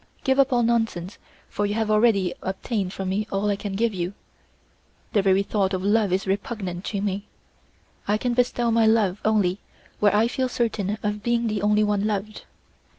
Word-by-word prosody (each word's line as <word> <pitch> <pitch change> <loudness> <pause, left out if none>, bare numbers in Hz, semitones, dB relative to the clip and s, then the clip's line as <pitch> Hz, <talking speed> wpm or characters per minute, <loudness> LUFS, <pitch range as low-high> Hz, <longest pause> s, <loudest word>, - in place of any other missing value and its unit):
Give 265 +1 +2
up 275 0 +4
all 240 -1 +3
nonsense, 225 -6 -1 0.3
for 205 - -1
you 205 - -2
have 220 -1 0
already 210 -4 +3
obtained 190 0 -3
from 190 -1 -4
me 205 +3 -1
all 200 +1 0
I - - +1
can 200 0 -5
give 225 +1 +1
you. 180 0 -3 1.0
The 205 - +4
very 195 0 +3
thought 195 -2 0
of 185 - -4
love 205 -1 +2
is 190 +1 0
repugnant 195 -2 -3
to 200 -2 -2
me; 200 0 -3 0.8
I 210 +1 +2
can 245 +2 -1
bestow 240 -1 +1
my 225 -1 +4
love 210 -4 +2
only 205 -3 +2 0.4
where 205 -1 +4
I 220 +2 +4
feel 255 +1 -1
certain 215 -4 -1
of 210 0 -2
being 235 +1 0
the 215 -3 -1
only 210 +1 +3
one 210 0 +1
loved. 210 0 -4
210 Hz, 190 wpm, -24 LUFS, 195-225 Hz, 1.0 s, up